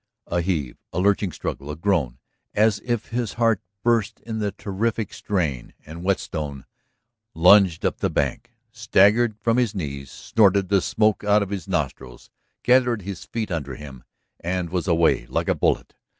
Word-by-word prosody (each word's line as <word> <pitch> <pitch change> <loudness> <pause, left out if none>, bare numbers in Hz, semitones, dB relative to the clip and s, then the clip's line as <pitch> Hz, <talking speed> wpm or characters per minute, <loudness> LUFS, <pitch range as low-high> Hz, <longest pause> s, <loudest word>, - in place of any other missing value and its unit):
A 85 0 -1
heave, 80 -8 -2
a - - -6
lurching 100 0 +2
struggle, 70 -2 -5
a 75 - -4
groan 80 -8 0 0.4
as 105 0 +3
if 120 -3 -2
his 120 -2 -2
heart 115 -3 +2 0.2
burst 115 -3 +1
in 110 -1 -5
the 105 -1 -1
terrific 110 +3 -3
strain, 80 -11 -2
and 80 +2 -9
Whetstone 75 -7 -2 0.7
lunged 90 0 +5
up - - 0
the - - 0
bank, 70 -3 -1 0.2
staggered 105 +3 +3
from 115 +2 +2
his 120 -4 +1
knees, 70 -6 -5
snorted 100 -3 +2
the 100 -2 +3
smoke 110 +2 +1
out 105 0 +4
of 100 - -7
his 95 -5 -4
nostrils, 60 -2 -4 0.3
gathered 125 -4 +3
his 95 -1 -7
feet 110 -4 -4
under 70 -6 -3
him, 70 -4 -10 0.4
and 90 -1 -3
was 90 0 -2
away 80 -8 +2
like - - -2
a - - +3
bullet. - - 0
95 Hz, 165 wpm, -23 LUFS, 80-110 Hz, 0.7 s, lunged